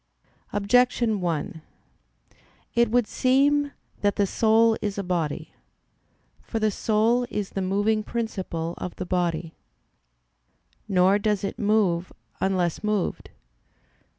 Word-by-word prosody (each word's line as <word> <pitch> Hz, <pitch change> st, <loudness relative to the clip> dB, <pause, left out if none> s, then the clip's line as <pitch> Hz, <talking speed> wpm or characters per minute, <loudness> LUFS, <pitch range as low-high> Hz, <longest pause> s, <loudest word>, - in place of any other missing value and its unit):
Objection 225 Hz, 0 st, +2 dB
1: 165 Hz, -2 st, -2 dB, 1.1 s
It 235 Hz, -1 st, +3 dB
would 245 Hz, +1 st, +3 dB
seem 285 Hz, +5 st, +2 dB, 0.3 s
that 205 Hz, -1 st, +1 dB
the 205 Hz, -, +2 dB
soul 225 Hz, +2 st, +3 dB
is 205 Hz, -2 st, -3 dB
a 200 Hz, -, -2 dB
body. 165 Hz, -3 st, -2 dB, 0.9 s
For 230 Hz, -, -5 dB
the 215 Hz, -1 st, +1 dB
soul 225 Hz, +4 st, +1 dB
is 205 Hz, -2 st, -3 dB
the 195 Hz, -, -3 dB
moving 205 Hz, +3 st, +1 dB
principle 190 Hz, -8 st, -4 dB
of 180 Hz, -, -5 dB
the 185 Hz, -, -5 dB
body. 175 Hz, -3 st, -1 dB, 1.3 s
Nor 190 Hz, 0 st, +4 dB
does 210 Hz, -2 st, 0 dB
it 195 Hz, -, -4 dB
move 200 Hz, -5 st, +1 dB, 0.3 s
unless 185 Hz, -2 st, 0 dB
moved. 210 Hz, -3 st, -1 dB
205 Hz, 115 wpm, -25 LUFS, 180-225 Hz, 1.3 s, Nor